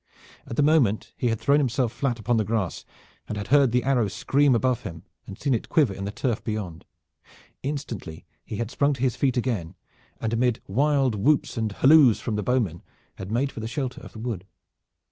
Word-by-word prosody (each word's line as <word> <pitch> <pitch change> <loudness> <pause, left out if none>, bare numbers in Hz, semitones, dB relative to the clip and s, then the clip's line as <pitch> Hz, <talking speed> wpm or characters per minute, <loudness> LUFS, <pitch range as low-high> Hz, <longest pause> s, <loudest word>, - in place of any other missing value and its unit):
At - - -5
the 145 - +3
moment 140 -9 +2
he 125 - -1
had 115 -2 0
thrown 140 +1 +3
himself 130 -3 0
flat 125 -2 -1
upon 115 +1 0
the 110 - +2
grass 105 -4 -2 0.4
and 105 - -4
had 100 - -5
heard 140 -2 +5
the 125 +1 +2
arrow 125 -5 +2
scream 135 +7 +2
above 125 0 +1
him, 80 -1 -8 0.2
and 95 - -8
seen 140 -2 0
it 115 - -2
quiver 150 - +3
in 95 0 -6
the 100 - -3
turf 120 +1 -2
beyond. 105 -7 -5 0.8
Instantly 125 - -5 0.2
he - - -6
had 115 +2 -3
sprung 145 +1 +2
to 130 - -7
his 125 -4 +1
feet 130 -3 0
again 115 -10 -2 0.4
and 115 0 -2
amid 120 0 +1
wild 135 +3 +2
whoops 135 +9 +1
and 110 -3 -1
halloos 135 +1 +6
from 115 - -3
the 105 - -1
bowmen 105 -8 0 0.4
had 95 +1 -7
made 135 +5 0
for - - -8
the 110 - -4
shelter 130 +2 -4
of - - -12
the - - -11
wood. 110 -5 -5
120 Hz, 205 wpm, -25 LUFS, 105-135 Hz, 0.8 s, halloos